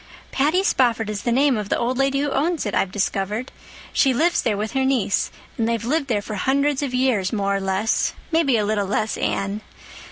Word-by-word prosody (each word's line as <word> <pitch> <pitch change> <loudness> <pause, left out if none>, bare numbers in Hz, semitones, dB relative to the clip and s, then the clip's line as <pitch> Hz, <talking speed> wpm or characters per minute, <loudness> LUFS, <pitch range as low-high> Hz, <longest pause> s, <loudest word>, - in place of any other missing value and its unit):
"Patty 310 +8 +2
Spofford 230 - +1
is 205 -1 -4
the 240 - -1
name 270 +2 +3
of 210 -2 -4
the - - +1
old 245 +2 -1
lady 275 0 +2
who 290 -1 -1
owns 320 +1 0
it, 205 - -3
I've 190 - +1
discovered. 205 +4 -2 0.4
She 265 -3 +3
lives 340 +7 +2
there 215 -4 0
with 215 +1 -3
her 265 -1 0
niece, 260 -7 +1 0.3
and 225 0 +1
they've 230 -1 -1
lived 290 +3 0
there 210 -5 0
for 215 - -6
hundreds 275 +7 +1
of 280 -3 -2
years, 250 -7 +1
more 200 -2 0
or 195 - -1
less—maybe 225 - 0
a 210 - +1
little 205 -1 0
less, 215 +2 -1
Anne. 200 +2 -2
235 Hz, 210 wpm, -22 LUFS, 205-275 Hz, 0.4 s, name